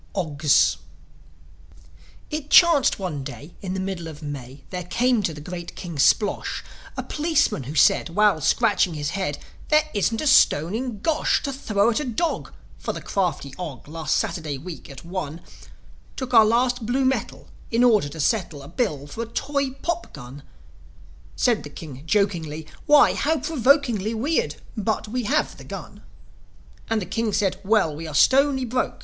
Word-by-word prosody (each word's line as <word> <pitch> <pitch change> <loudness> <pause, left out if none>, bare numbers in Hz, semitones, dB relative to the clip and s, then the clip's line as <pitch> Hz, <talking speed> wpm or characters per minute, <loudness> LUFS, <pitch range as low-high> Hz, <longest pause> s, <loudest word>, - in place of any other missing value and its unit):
OGS 150 -6 +2 1.5
It 300 -1 -4
chanced 335 -6 +6
one 170 -8 -4
day, 150 +5 -9
in 190 -1 -4
the - - -2
middle 190 -3 -4
of 155 -1 -10
May, 135 -2 -7
There 180 -1 -4
came 240 +5 +2
to 185 - -1
the 150 - -9
great 175 +2 -7
King 170 -4 -7
Splosh 205 +8 +2 0.3
A - - -2
policeman, 300 - 0
who 145 +5 -6
said, 150 - +4
while 200 -2 +3
scratching 200 - +2
his 145 -1 -3
head, 190 -7 -2 0.3
"There 305 0 +4
isn't 220 +3 0
a - - -2
stone 170 - +4
in 235 -3 -4
Gosh 315 +3 +1
To 275 - -2
throw 220 -4 +1
at 230 - 0
a - - -2
dog; 260 +6 -2 0.3
for - - -3
the - - -7
crafty 175 -8 -2
Og, 155 -9 -7
Last 160 0 -1
Saturday 155 -5 -2
week, 165 +4 -9
at 140 +2 -11
one, 170 -3 -5 0.8
Took 255 -2 -5
our 225 -2 +8
last 240 +2 +1
blue 260 +2 +1
metal, 265 +1 -2 0.2
in 235 +1 +2
order 215 -11 +4
to 160 - -9
settle 160 -4 0
A - - -10
bill 160 - -2
for 145 +10 -7
a 230 - -4
toy 280 +3 -1
pop 345 0 -3
gun." 135 0 -10 0.9
Said 240 -3 +2
the 145 - -9
King, 145 -3 -9
jokingly, 165 -6 0 0.2
"Why, 295 -1 +6
how 320 +2 +1
provokingly 250 -7 +2
Weird; 225 - 0 0.2
but 220 0 -1
we 245 +2 -3
have 300 +7 0
the - - -11
gun." - - -9 0.9
And 220 -2 0
the - - -6
King 225 +1 -1
said, 195 -2 0
"Well, 195 -7 +2
we 160 +2 -6
are 155 - -6
stony 265 - +4
broke." 250 +2 -2
200 Hz, 170 wpm, -23 LUFS, 155-250 Hz, 1.5 s, our